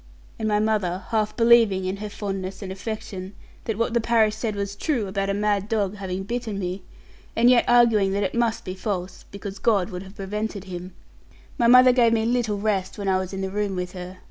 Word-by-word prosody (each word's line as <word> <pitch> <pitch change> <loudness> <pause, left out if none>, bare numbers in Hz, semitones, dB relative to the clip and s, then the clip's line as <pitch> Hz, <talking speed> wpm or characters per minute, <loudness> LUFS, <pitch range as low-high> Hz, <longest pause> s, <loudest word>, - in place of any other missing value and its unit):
And 220 - -1
my 210 -1 +2
mother 205 -4 0
half 215 -2 0
believing, 230 -5 +5
in 190 +1 -2
her 210 +1 -5
fondness 195 -1 -5
and 190 - -5
affection, 195 -1 -6 0.3
that 220 -3 -2
what 230 0 0
the 235 - +2
parish 220 -2 +3
said 220 -1 -3
was 200 0 -3
true 245 -2 -1
about 195 0 -2
a - - +1
mad 205 -1 0
dog 210 -2 0
having 190 -1 -4
bitten 230 -1 -3
me, 185 0 -3 0.5
and 240 +2 +5
yet 245 - +4
arguing 230 -5 +4
that 200 +1 0
it 190 - -1
must 235 -1 0
be 185 - -4
false 185 -2 -4
(because 200 0 -7
God 205 -4 +2
would 180 0 -5
have 190 +1 -12
prevented 210 0 -4
him), 180 -1 -8 0.6
my 235 - +4
mother 250 +1 +8
gave 240 -2 +4
me 225 -1 +1
little 235 -3 0
rest, 200 -2 -1
when 200 -1 -4
I 190 -1 +3
was 185 -1 -4
in 195 0 -4
the 190 0 -3
room 205 -1 -1
with 180 0 -3
her. 180 0 -8
205 Hz, 220 wpm, -24 LUFS, 190-225 Hz, 0.6 s, mother